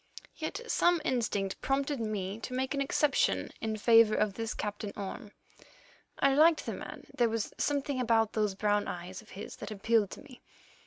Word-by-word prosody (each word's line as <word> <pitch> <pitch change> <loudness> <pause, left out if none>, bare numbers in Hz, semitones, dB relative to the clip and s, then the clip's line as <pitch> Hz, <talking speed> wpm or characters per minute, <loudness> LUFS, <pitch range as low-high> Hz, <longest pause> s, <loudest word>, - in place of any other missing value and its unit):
Yet - - -4
some 350 -6 +3
instinct 210 -7 -1
prompted 275 +1 0
me 210 -2 -3
to 255 +2 -5
make 260 +2 -1
an 280 - -1
exception 280 +1 +1
in 220 -1 -2
favour 225 0 +6
of 210 -2 +1
this 225 +1 -4
Captain 205 0 -4
Orme. 200 +1 -6 0.9
I 275 -1 +3
liked 315 +3 +5
the - - -3
man; - - -8
there 240 -2 +3
was 225 -2 -2
something 285 -2 0
about 225 -2 +2
those 210 -3 0
brown 205 +1 +1
eyes 180 +2 -6
of 220 - -20
his - - -7
that 210 - -7
appealed 215 0 +1
to - - -10
me. 255 -3 -15
225 Hz, 175 wpm, -31 LUFS, 205-265 Hz, 0.9 s, favour